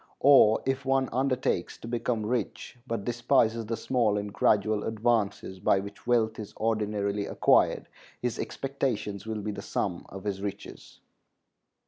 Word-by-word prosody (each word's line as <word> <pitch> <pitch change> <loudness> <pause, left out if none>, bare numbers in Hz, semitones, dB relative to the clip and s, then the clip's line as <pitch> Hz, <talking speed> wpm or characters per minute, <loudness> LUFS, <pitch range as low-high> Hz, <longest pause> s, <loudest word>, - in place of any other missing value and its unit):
Or 135 -6 +6
if 135 +1 -1
one 135 -1 +1
undertakes 130 -8 0
to - - -10
become 115 -2 -1
rich, 120 0 -3
but 115 -4 -3
despises 120 -2 +1
the 115 0 -2
small 115 -3 +1
and 105 0 -4
gradual 105 0 +2
advances 110 -4 0
by 95 - +3
which 100 +3 -9
wealth 110 -2 +2
is 105 - -8
ordinarily 105 -2 -1
acquired, - - +3 0.3
his 120 -1 -2
expectations 115 -7 -3
will 110 -1 -3
be 105 - -2
the 100 - -6
sum - - -3
of 95 0 -9
his 100 -2 -3
riches. 100 0 -7
110 Hz, 145 wpm, -28 LUFS, 105-120 Hz, 0.3 s, Or